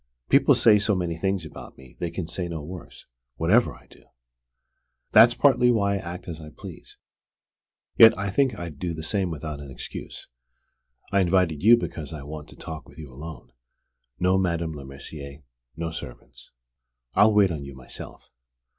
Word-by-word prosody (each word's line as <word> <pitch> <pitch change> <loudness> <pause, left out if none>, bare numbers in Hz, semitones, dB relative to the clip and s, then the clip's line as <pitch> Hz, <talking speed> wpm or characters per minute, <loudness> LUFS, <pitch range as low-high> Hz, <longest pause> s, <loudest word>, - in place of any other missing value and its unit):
People - - +5
say 105 -2 +5
so 105 0 +1
many 85 -2 -2
things 95 +1 -1
about 80 - -11
me, 65 -2 -16
they 85 - -2
can 85 +1 -4
say 85 +2 -4
no 80 -3 -5
worse, 90 +3 -10 0.3
whatever 105 +9 +3
I - - -19
do! - - -20 1.1
That's - - +7
partly 125 0 +4
why 100 -4 +2
I - - 0
act 90 -1 -7
as 80 -2 -6
I 75 - -9
please. - - -12 1.0
Yet 115 0 +9
I 100 0 -2
think 130 0 +1
I'd 85 -5 -7
do 85 -2 -3
the 80 - -7
same 95 +2 -1
without 75 -2 -5
an 70 -1 -9
excuse. 65 - -8 0.8
I 100 - +3
invited 90 -4 +2
you 115 +4 +7
because 80 -9 -5
I 75 -3 -7
want 75 +1 -8
to - - -14
talk 80 -1 -8
with - - -18
you 75 -5 -10
alone; 70 -4 -10 0.7
no 90 +1 +3
Madame 85 -3 -1
Lemercier; 70 +1 -10 0.3
no 80 0 -3
servants. - - -10 0.6
I'll 105 +1 +5
wait 100 -3 +5
on 75 -4 -4
you 70 -1 -9
myself." 65 -1 -11
85 Hz, 170 wpm, -25 LUFS, 75-95 Hz, 1.1 s, Yet